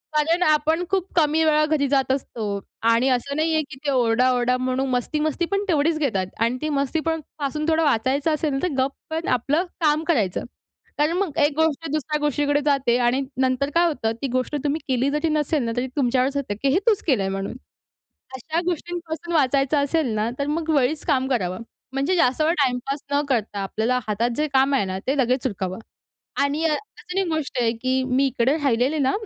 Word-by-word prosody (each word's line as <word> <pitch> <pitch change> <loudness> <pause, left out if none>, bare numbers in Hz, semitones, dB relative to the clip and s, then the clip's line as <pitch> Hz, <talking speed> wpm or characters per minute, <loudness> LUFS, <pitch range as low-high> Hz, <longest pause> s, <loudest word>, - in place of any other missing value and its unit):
कारण, 330 +4 +2
आपण 310 +2 +2
खूप 385 -1 0
कमी 320 -1 +3
वेळा 305 0 +4
घरी 300 -2 +1
जात 270 -1 +2
असतो 250 -4 -4 0.5
आणि 230 +3 +3
असं 260 +2 0
नाही 320 +1 +1
आहे 315 - +3
की - - -8
ते, 285 - +1
ओरडा, 250 -1 +3
ओरडा 250 0 +1
म्हणून 255 +1 -1
मस्ती-मस्ती 300 +6 -1
पण 395 - +1
तेवढीच 315 0 +2
घेतात. 200 -11 0
आणि 230 +2 +1
ती 310 - 0
मस्तीपण 310 +3 -1 0.2
पासून 300 +2 -2
थोडं 325 0 +2
वाचायचं 280 +3 +1
असेल, 295 -3 -1
तर 365 - +3
गप 265 +1 +2 0.2
पण 325 +1 -3
आपलं 290 +8 0 0.2
काम 305 0 +2
करायचं. 220 - +1 0.6
कारण, 300 +3 +2
मग 365 -7 -2
एक 290 - 0
गोष्ट 320 0 0
दुसऱ्या 300 0 -1
गोष्टीकडे 290 0 +1
जाते 275 -4 +2
आणि 255 +3 +2 0.2
नंतर 260 +2 +1
काय 345 +1 +5
होतं, 250 -9 -1
ती 275 - -1
गोष्ट 255 +3 -1
तुम्ही 295 +3 0
केली 260 0 +1
जरी 300 +2 0
नसेल 300 -2 0
ना, 230 - -2
तरी 255 - 0
तुमच्यावरच 260 +1 +1
येते, 255 -8 -2
की 275 - +3
हे 365 - +4
तूच 430 -4 +4
केलं 260 -9 +3
आहे 195 - -1
म्हणून. 195 +4 -4 0.8
अशा 315 +6 -2
गोष्टींपासून 345 -1 -4
वाचायचं 275 0 +2
असेल 310 +1 0
ना, 215 +2 0
तर 280 - -1
मग 320 +2 -2
वेळीच 280 +3 +1
काम 265 -1 +1
करावं. 185 -6 -1 0.3
म्हणजे 275 +7 +1
जास्त 265 -2 +2
वेळ 320 +2 +3
टाईमपास 270 +2 -1
न 285 0 +3
करता, 215 -5 -1
आपल्याला 220 +6 0
हातात 220 +3 0
जे 305 - +1
काम 270 +1 +3
आहे 260 - +1
ना, 190 0 -4
ते 275 +2 +1
लगेच 255 0 +1
उरकाव. 190 -5 -4 0.7
आणि 290 +3 -1
अ, 320 - +3
अजून 370 +1 -7
एक 375 - -2
गोष्ट 315 -4 -3
आहे 230 -1 +2
की 260 0 +1
मी, 260 +2 +1
इकडे 260 +3 +1
राहिलेले 275 0 +1
ना 265 -1 +2
280 Hz, 200 wpm, -23 LUFS, 255-310 Hz, 0.8 s, काय